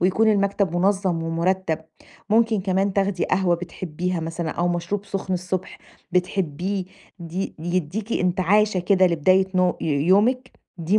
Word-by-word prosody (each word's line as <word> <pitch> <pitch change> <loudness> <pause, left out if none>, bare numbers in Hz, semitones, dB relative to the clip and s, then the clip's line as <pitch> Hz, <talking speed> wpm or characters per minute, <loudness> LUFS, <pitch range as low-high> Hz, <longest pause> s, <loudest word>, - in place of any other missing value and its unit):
ويكون 190 +5 +3
المكتب 200 -3 0
مُنظّم 190 -2 +1
ومُرتّب، 165 0 0 0.5
ممكن 225 -2 +3
كمان 190 +1 0
تاخدي 195 -2 0
قهوة 185 -2 +2
بتحبّيها 175 0 -4
مثلًا 165 0 -3
أو 175 +3 -1
مشروب 175 +4 -2
سُخن 195 -1 -3
الصبح 185 +1 -4 0.3
بتحبّيه 180 +1 -1 0.3
دي 175 +3 -5
يدّيكِ 180 +6 -2
انتعاشة 185 +2 +2
كده 185 0 +4
لبداية 185 +3 +3
نو 180 -1 +2
ي - - -3
يومِك، 200 - +2 0.3
دي 180 +6 +2
185 Hz, 130 wpm, -23 LUFS, 175-200 Hz, 0.5 s, كده